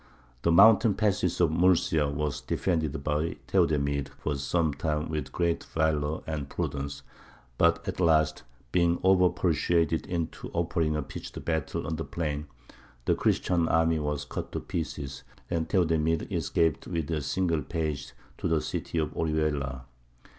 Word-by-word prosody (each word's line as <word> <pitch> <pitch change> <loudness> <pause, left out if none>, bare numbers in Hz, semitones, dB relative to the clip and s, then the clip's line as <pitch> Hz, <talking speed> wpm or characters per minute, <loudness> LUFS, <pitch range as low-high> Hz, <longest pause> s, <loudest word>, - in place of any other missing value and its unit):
The 85 - +2
mountain 110 +4 +7
passes 100 -5 +1
of 85 -3 +4
Murcia 85 -3 +3
were 75 +1 -1 0.2
defended 80 -5 -1
by 75 +2 0
Theodemir 70 -1 +1
for 75 - -2
some 75 +3 0
time 75 +2 -2
with 75 -4 -3
great 85 -1 0
valour 80 -1 0
and 75 -3 -4
prudence; 70 0 -4 0.6
but 85 0 +3
at - - -3
last, 80 -3 +3 0.3
being 85 -1 +2
over 95 -1 +5
persuaded 85 -1 +1
into 85 -2 -3
offering 80 -2 0
a 75 - -1
pitched 65 - -8
battle 80 -3 -1
on 80 - -2
the 80 - -3
plain, 75 -3 -3 0.6
the - - +3
Christian 85 -2 +1
army 80 -1 +3
was 75 -1 -2
cut - - -5
to - - -1
pieces, 75 -7 -5 0.3
and 80 -2 -1
Theodemir 80 -3 +2
escaped 80 -3 0
with 85 -3 -2
a 80 -2 0
single 85 +2 0
page 75 -4 -3 0.3
to - - -1
the 80 -1 +2
city 85 - -4
of 75 -2 0
Orihuela. 75 -5 -1
80 Hz, 145 wpm, -28 LUFS, 75-85 Hz, 0.6 s, mountain